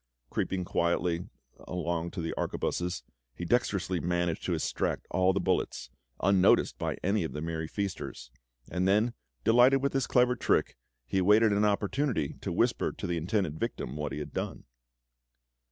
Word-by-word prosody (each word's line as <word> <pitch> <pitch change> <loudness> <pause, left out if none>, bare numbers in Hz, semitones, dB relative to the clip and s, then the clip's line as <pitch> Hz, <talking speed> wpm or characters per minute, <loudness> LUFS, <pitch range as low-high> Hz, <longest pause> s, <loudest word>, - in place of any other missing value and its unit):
Creeping 90 -2 -1
quietly 85 0 0 0.4
along 85 -1 -2
to 90 0 -5
the 80 - -2
arquebuses, 90 0 -2 0.3
he 90 - -5
dexterously 95 -4 +1
managed 85 -1 -1
to - - +1
extract - - -1
all 95 +2 +3
the 95 - 0
bullets, 90 - -1 0.3
unnoticed 95 -1 +4
by - - -2
any 100 +2 +2
of 80 - -4
the 75 - -4
merry 80 -1 -3
feasters; 85 -10 -5 0.4
and 90 +1 +1
then, 105 +5 +3 0.3
delighted 125 +4 +5
with 140 - +1
his 135 -2 +1
clever 125 0 +4
trick, - - +1 0.3
he 65 +10 0
awaited 105 +4 +5
an 100 +1 +3
opportunity 105 - 0
to - - -3
whisper - - +1
to - - -7
the 85 - -1
intended 85 -2 -1
victim 65 - -3
what 75 0 -3
he - - -4
had 75 - -6
done. - - -4
90 Hz, 160 wpm, -30 LUFS, 85-105 Hz, 0.4 s, delighted